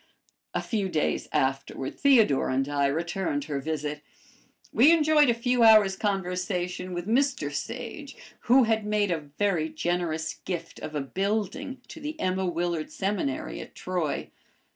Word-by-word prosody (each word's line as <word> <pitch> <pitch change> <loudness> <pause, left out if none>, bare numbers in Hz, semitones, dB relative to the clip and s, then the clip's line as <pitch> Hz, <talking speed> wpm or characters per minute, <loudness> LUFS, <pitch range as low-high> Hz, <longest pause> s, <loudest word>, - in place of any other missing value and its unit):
A - - 0
few 205 -4 -1
days 155 -4 0
afterward 135 -1 -1
Theodore 230 - +4
and 135 +1 0
I 145 -1 +1
returned 165 0 -1
her 145 -2 -3
visit. 150 0 -3 0.7
We 275 +8 +7
enjoyed 310 -3 +5
a - - +5
few 245 +1 +1
hours' 215 -4 +7
conversation 180 -2 -2
with 175 +2 -4
Mr 240 - +1
Sage, 245 - -6 0.3
who 255 +2 +6
had 220 -1 +1
made 210 -2 +1
a 165 - 0 0.2
very 180 -6 +1
generous 160 -1 -2
gift 170 -3 -5
of 155 - -7
a 145 - 0
building 210 - -2
to 320 - -9
the 305 +2 -5
Emma 185 0 0
Willard 170 -2 -2
Seminary 190 -9 -2
at - - -12
Troy. 180 -5 -3
185 Hz, 145 wpm, -27 LUFS, 155-225 Hz, 0.7 s, We